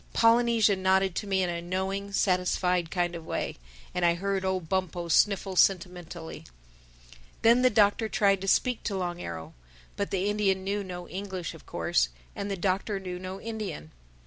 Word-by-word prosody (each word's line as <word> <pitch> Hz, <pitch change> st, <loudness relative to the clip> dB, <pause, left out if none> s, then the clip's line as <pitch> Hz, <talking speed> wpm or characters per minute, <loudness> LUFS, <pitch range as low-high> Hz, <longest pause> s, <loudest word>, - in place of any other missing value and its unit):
Polynesia 230 Hz, -2 st, +4 dB
nodded 190 Hz, 0 st, +2 dB
to 205 Hz, -, -4 dB
me 190 Hz, -1 st, +2 dB
in 180 Hz, -, 0 dB
a 170 Hz, 0 st, -3 dB
knowing, 190 Hz, +3 st, -3 dB
satisfied 180 Hz, -2 st, +1 dB
kind 175 Hz, -1 st, 0 dB
of 170 Hz, -1 st, -6 dB
way. -, -, -3 dB, 0.4 s
And 180 Hz, -, -1 dB
I 170 Hz, 0 st, +4 dB
heard 195 Hz, +1 st, -1 dB
old 190 Hz, -3 st, -1 dB
Bumpo 175 Hz, -1 st, -2 dB
sniffle 195 Hz, +1 st, +3 dB
sentimentally. 175 Hz, -3 st, 0 dB, 1.0 s
Then 235 Hz, +2 st, +6 dB
the 255 Hz, -, +5 dB
Doctor 215 Hz, 0 st, +3 dB
tried 200 Hz, -3 st, +2 dB
to 195 Hz, -, -4 dB
speak 250 Hz, +4 st, +2 dB
to 200 Hz, -3 st, -1 dB
Long 175 Hz, -1 st, -3 dB
Arrow. 80 Hz, -1 st, -6 dB, 0.4 s
But 200 Hz, -, -2 dB
the 195 Hz, 0 st, 0 dB
Indian 200 Hz, -2 st, +1 dB
knew 200 Hz, +1 st, -1 dB
no 180 Hz, -2 st, -7 dB
English 190 Hz, -3 st, -5 dB
of -, -, -15 dB
course, -, -, +1 dB, 0.3 s
and 200 Hz, -, -4 dB
the 195 Hz, -, -2 dB
Doctor 195 Hz, +2 st, -1 dB
knew 180 Hz, -2 st, -6 dB
no 185 Hz, +1 st, -6 dB
Indian. 210 Hz, -, -6 dB
190 Hz, 170 wpm, -28 LUFS, 180-200 Hz, 1.0 s, Then